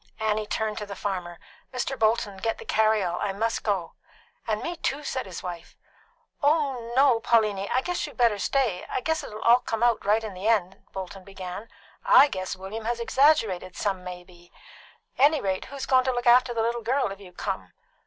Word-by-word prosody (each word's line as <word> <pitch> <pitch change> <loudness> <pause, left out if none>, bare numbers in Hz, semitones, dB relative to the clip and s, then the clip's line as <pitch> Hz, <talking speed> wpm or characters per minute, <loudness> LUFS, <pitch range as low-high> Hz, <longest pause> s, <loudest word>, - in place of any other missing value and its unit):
Annie 215 -1 0
turned 215 -1 -2
to 210 - -6
the 200 - -7
farmer. 180 -4 -4 0.3
"Mr. 255 +1 -2
Bolton, 220 -3 +1
get 225 +3 -2
the - - -10
carry 220 -1 +2
all. 175 -1 -2
I 200 - -1
must 225 +3 -1
go." 190 -6 -1 0.5
"And 215 -1 -1
me 345 +1 -3
too," 290 0 -2
said 260 -6 -3
his 185 - -8
wife. 175 -2 -7 0.6
"Why, 280 -6 +1
no, 265 -3 +5
Pauliny; 215 -4 +1
I 255 - +2
guess 355 +4 -2
you - - -12
better 230 -5 +3
stay. 230 -7 0
I - - -2
guess 320 +2 -1
it'll 215 0 -8 0.2
come 225 -2 -3
out 240 -2 +4
all 200 - -4
right 220 +2 +3
in 215 -3 -5
the 185 +3 -4
end," 195 -5 0
Bolton 190 0 -7
began. 195 +2 -8 0.3
"I 290 - +7
guess 185 -4 -4
William 200 +4 -7
has 235 +1 -1
exaggerated 225 - +2
some 195 -3 -2
may 180 -1 -7
be. 175 -1 -19 0.7
Anyrate, 270 -10 +2
who's 275 0 -6
goin' 260 -1 +4
to 260 - +2
look 245 0 -3
after 245 +1 +6
the 230 -1 0
little 235 +1 -1
girl 255 -1 0
if 195 - -8
you 190 -3 -13
come?" 95 - -4
215 Hz, 200 wpm, -26 LUFS, 190-245 Hz, 0.7 s, I